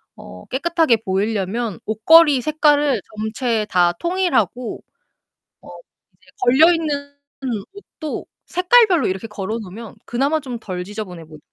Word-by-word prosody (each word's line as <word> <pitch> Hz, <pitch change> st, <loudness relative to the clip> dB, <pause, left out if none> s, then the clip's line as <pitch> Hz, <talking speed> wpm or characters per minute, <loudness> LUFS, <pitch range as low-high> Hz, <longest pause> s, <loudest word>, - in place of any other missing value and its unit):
어 90 Hz, 0 st, -12 dB
깨끗하게 320 Hz, -2 st, +1 dB
보이려면 205 Hz, +3 st, -2 dB
옷걸이 275 Hz, +6 st, +5 dB
색깔을 295 Hz, -5 st, +2 dB, 0.2 s
전체 220 Hz, 0 st, -1 dB
다 175 Hz, -1 st, +3 dB
통일하고 250 Hz, -, -1 dB, 0.8 s
어 -, -, -15 dB, 0.5 s
이제 -, -, -28 dB
걸려 295 Hz, +8 st, +6 dB
있는 285 Hz, -3 st, -3 dB, 0.6 s
옷도 315 Hz, -6 st, -7 dB, 0.2 s
색깔별로 365 Hz, -, +4 dB
이렇게 190 Hz, +4 st, -4 dB
걸어 210 Hz, +2 st, -4 dB
놓으면 215 Hz, +2 st, -9 dB
그나마 280 Hz, +6 st, 0 dB
좀 255 Hz, -4 st, -6 dB
덜 185 Hz, -5 st, -5 dB
지저분해 190 Hz, -5 st, -7 dB
보 155 Hz, -1 st, -13 dB
240 Hz, 275 characters per minute, -20 LUFS, 205-305 Hz, 0.8 s, 걸려